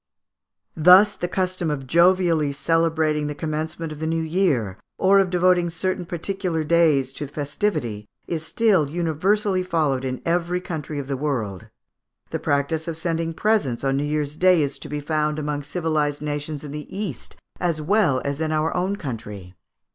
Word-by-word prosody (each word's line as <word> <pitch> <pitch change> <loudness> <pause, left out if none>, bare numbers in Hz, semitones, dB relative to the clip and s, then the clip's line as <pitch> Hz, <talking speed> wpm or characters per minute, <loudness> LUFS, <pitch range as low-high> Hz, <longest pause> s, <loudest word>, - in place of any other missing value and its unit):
Thus, 185 +6 +7
the 175 - -3
custom 185 -2 -1
of 140 -3 -3
jovially 170 -1 +3
celebrating 160 0 +1
the 150 - -4
commencement 155 +1 -4
of 150 - -8
the 160 - -2
new 165 0 0
year, 155 - 0 0.2
or 195 +1 +5
of 195 -2 +2
devoting 180 -1 +3
certain 175 +1 -2
particular 175 -1 -2
days 150 -5 +3
to 145 - -5
festivity, 145 - -2 0.2
is 160 -2 -3
still 190 -5 +2
universally 185 +5 +1
followed 155 -7 0
in 130 -1 -3
every 175 +1 0
country 155 -4 -5
in 140 - -3
the 135 0 -2
world. 125 -10 -3 0.6
The - - -2
practice 145 +3 -1
of 165 -2 -4
sending 165 0 -2
presents 200 - +1
on 135 0 +1
New 140 - 0
Year's 150 0 -2
Day 180 -3 +5
is 140 0 -3
to - - -8
be 150 0 -3
found 150 0 0
among 150 -1 -2
civilised 150 -1 -1
nations 145 0 -4
in 145 - -7
the 150 0 -6
East 190 - -6 0.2
as 170 -3 0
well 155 -5 +2
as 140 +2 -2
in 160 0 0
our 155 +1 0
own 185 +3 0
country. 110 - -7
155 Hz, 170 wpm, -23 LUFS, 145-175 Hz, 0.6 s, Thus